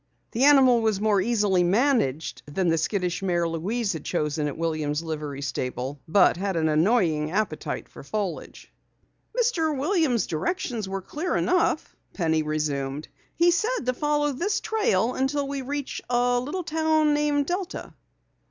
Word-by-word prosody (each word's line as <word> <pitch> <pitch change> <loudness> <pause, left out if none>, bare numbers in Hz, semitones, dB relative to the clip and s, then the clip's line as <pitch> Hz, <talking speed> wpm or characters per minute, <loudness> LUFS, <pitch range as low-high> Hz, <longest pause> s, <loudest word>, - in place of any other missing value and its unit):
The 245 +4 +2
animal 265 -5 +6
was 220 -3 +1
more 210 -2 +2
easily 205 -4 +2
managed 185 - +1
than 175 +4 0
the 165 - +2
skittish 180 +1 -1
mare 175 -3 +1
Louise 195 +7 -1
had 160 - -6
chosen 150 0 -1
at 145 - -5
Williams' 155 -2 -1
Livery 150 -3 -5
Stable, 130 +1 -4
but 180 +1 +4
had 195 0 -2
an 160 -1 +1
annoying 160 -2 +2
appetite 210 +5 -2
for - - -12
foliage. 205 -5 -5 0.7
"Mr. 325 - +1
Williams' 295 - +1
directions 220 - -2
were 195 -1 -4
clear 315 - -3
enough," 350 -3 +1 0.2
Penny 160 -3 +1
resumed. 150 -2 -2 0.3
"He 345 +1 +4
said 430 - 0
to 255 - +1
follow 295 +2 0
this 355 +10 -1
trail 255 - +1
until 275 +2 -1
we 275 0 -3
reach 280 +1 -4
a 245 0 +2
little 295 +9 -4
town 315 -1 +2
named 295 -1 +1
Delta." 360 +3 -4
215 Hz, 150 wpm, -25 LUFS, -, 0.7 s, animal